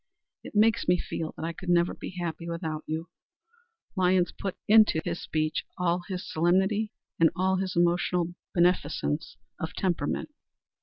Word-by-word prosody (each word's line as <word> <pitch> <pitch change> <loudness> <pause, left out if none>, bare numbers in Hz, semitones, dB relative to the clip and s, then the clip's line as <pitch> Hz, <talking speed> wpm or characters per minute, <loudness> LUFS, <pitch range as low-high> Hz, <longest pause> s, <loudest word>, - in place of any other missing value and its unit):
It - - -10
makes 215 +1 +4
me 180 0 +4
feel 160 -2 -4
that - - -4
I 165 - -3
could 180 +2 -7
never 175 0 +3
be 185 - -8
happy 170 0 -4
without 160 -2 -3
you." 160 +2 -3 0.9
Lyons 180 -1 +3
put 195 -2 -4
into 215 -6 +6
this - - -2
speech 155 0 -1
all 180 0 +1
his 185 -1 -4
solemnity 190 +6 +2 0.3
and 165 -1 +6
all 190 0 +2
his 190 0 -2
emotional 175 0 +2 0.2
beneficence 165 -3 +1 0.2
of 160 - -4
temperament. 175 - -1
175 Hz, 150 wpm, -28 LUFS, 165-185 Hz, 0.9 s, into